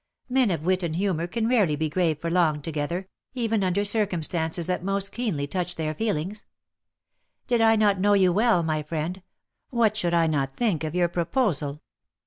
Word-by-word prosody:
Men 255 -3 +2
of 165 -5 -2
wit 185 +2 +1
and 165 -3 -2
humour 175 -3 -1
can 220 +5 -1
rarely 210 -11 +3
be 155 +2 -1
grave 160 -1 0
for 165 +1 -3
long 160 -5 +2
together, 165 +5 -3 0.3
even 225 -4 0
under 185 +2 +1
circumstances 175 -5 0
that 180 0 -2
most 195 +1 -2
keenly 205 -12 -2
touch 180 +3 -3
their 155 -1 -2
feelings; 205 +2 -3 1.0
did 240 -2 +1
I 225 0 +5
not 205 -3 +3
know 205 +2 +3
you 185 -3 +4
well, 215 -3 +3
my 155 -1 -1
friend, 160 +4 -4 0.5
what 230 -4 +2
should 175 -5 0
I 165 -1 +4
not 140 -4 -1
think 200 -10 0
of 155 +1 -3
your 175 -1 +3
proposal? 170 - -1
180 Hz, 180 wpm, -25 LUFS, 160-210 Hz, 1.0 s, I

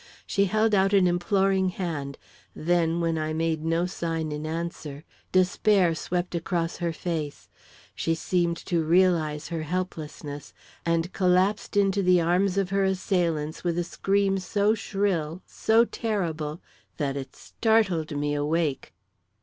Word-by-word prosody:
She 200 -1 +2
held 215 +2 +2
out 195 0 +3
an 195 -2 +5
imploring 190 +2 +2
hand; 155 -7 -4 0.4
then, 170 0 +1
when 165 -1 0
I 155 0 -2
made 160 -1 -1
no 165 +2 +1
sign 165 -3 -3
in 150 +1 -4
answer, 160 -3 -5 0.3
despair 185 -1 +3
swept 175 +2 -3
across 170 0 -2
her 170 -1 -1
face, 160 -3 -4 0.4
she 165 - -1
seemed 170 +1 0
to 170 -3 +1
realise 165 -3 +2
her 165 -2 -3
helplessness, 155 -4 -5 0.3
and 170 +2 0
collapsed 190 +3 +2
into 200 0 +3
the 180 -1 +4
arms 180 +3 +2
of 195 -1 0
her 195 0 +2
assailants 175 -5 0
with 175 -1 0
a 175 - +1
scream 195 +2 +1
so 205 +3 +1
shrill, 190 -6 -1
so 225 +1 +3
terrible 170 -10 -3 0.4
that 140 -3 -1
it 135 -1 -6
startled 190 -10 0
me 145 0 -1
awake. 150 0 -1
175 Hz, 140 wpm, -26 LUFS, 160-190 Hz, 0.4 s, an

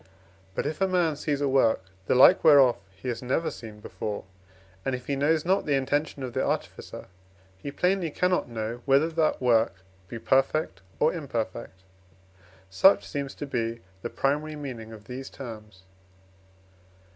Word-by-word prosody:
But - - -1
if 155 +4 -3
a 195 - +4
man 175 -4 +1
sees 145 0 -2
a 145 - +2
work, 125 -7 +2 0.2
the - - +3
like 135 +8 +7
whereof 140 -5 +7
he 95 +7 -11
has 120 - -3
never 130 +6 -1
seen 110 -2 -10
before, 105 -1 -5 0.6
and 135 - -1
if 125 - -8
he 140 - -1
knows 150 +3 +1
not 190 0 +1
the 145 - +3
intention 145 +1 -1
of 125 -2 -5
the - - 0
artificer, - - -4 0.5
he 95 +9 -7
plainly 180 +2 +1
cannot 180 -1 0
know, 115 +1 -4
whether 140 +4 +4
that 160 -1 +1
work 115 -6 +3 0.3
be 120 - -6
perfect 135 +6 +1 0.2
or 155 - +3
imperfect. 115 - -5 0.9
Such 95 - +4
seems 140 -2 -4
to - - -5
be 115 -3 -3 0.2
the - - -4
primary 150 +3 -1
meaning 125 -7 -7
of 110 -2 -11
these 130 +1 -7
terms. 105 -6 -10
135 Hz, 160 wpm, -27 LUFS, 115-155 Hz, 0.9 s, like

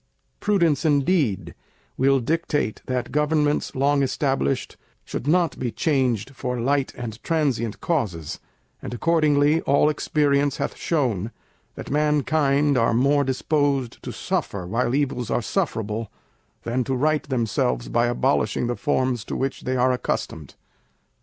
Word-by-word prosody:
Prudence, 170 -9 +2
indeed, 140 - +1 0.4
will 135 +1 +3
dictate 150 -3 -1
that 125 -1 -2
Governments 150 0 +1
long 140 +2 +2
established 135 -1 -1 0.3
should 135 - -5
not 170 -1 +2
be 125 -2 -2
changed 130 -7 0
for 125 -1 -3
light 135 +3 +1
and 115 -2 -6
transient 135 -9 -1
causes; 105 - -2 0.4
and 120 - -5
accordingly 155 +1 +3
all 140 +2 +3
experience 145 -2 +1
hath 140 - -3
shown, 120 - -1 0.5
that - - -7
mankind 145 -1 +2
are 115 0 +2
more 140 +4 +3
disposed 140 -1 0
to - - -6
suffer, 95 -3 -3
while 120 +6 0
evils 135 -5 -1
are - - +1
sufferable, 110 - -2 0.5
than 125 +2 -1
to 130 +3 -2
right 150 +2 0
themselves 110 - 0
by 120 +1 +2
abolishing 120 -2 +1
the 120 0 -1
forms 130 -5 0
to - - -5
which 135 0 -3
they 130 0 0
are 125 +1 +3
accustomed. 80 - -3
135 Hz, 135 wpm, -23 LUFS, 120-150 Hz, 0.5 s, will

